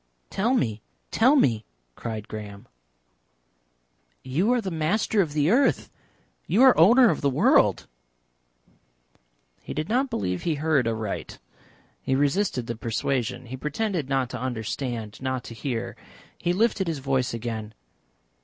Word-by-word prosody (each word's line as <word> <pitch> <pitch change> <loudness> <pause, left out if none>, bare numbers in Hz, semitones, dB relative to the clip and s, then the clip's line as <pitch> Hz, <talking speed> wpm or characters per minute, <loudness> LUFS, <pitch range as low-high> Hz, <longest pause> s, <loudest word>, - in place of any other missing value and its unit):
"Tell 235 +7 +1
me, 110 - -1 0.3
tell 255 +6 +4
me!" 115 - +2 0.3
cried 110 - -6
Graham. 105 -2 -8 1.6
"You 160 - +1
are 250 - +3
the 195 -5 -4
Master 185 +6 +1
of 155 -6 -2
the 150 +3 +2
Earth. 270 +4 +2 0.6
You 230 +7 +4
are 260 -2 +7
owner 235 +8 +6
of - - -3
the 140 - +2
world." 130 - +3 1.8
He - - -7
did 155 +1 -3
not 260 +4 +1
believe 90 - -2
he 165 -3 -1
heard 145 -4 +1
aright. 110 -3 -4 0.6
He 130 - 0
resisted 145 - 0
the 115 - -4
persuasion. 115 +2 -2
He 125 +2 -7
pretended 155 - -2
not 135 -2 0
to 125 - -5
understand, 120 -2 -4
not 130 -1 -2
to - - -9
hear. 120 -1 -4 0.4
He 175 - -1
lifted 195 0 +1
his 165 -2 -1
voice 135 -2 0
again. 110 -2 -5
135 Hz, 140 wpm, -25 LUFS, 115-190 Hz, 1.8 s, are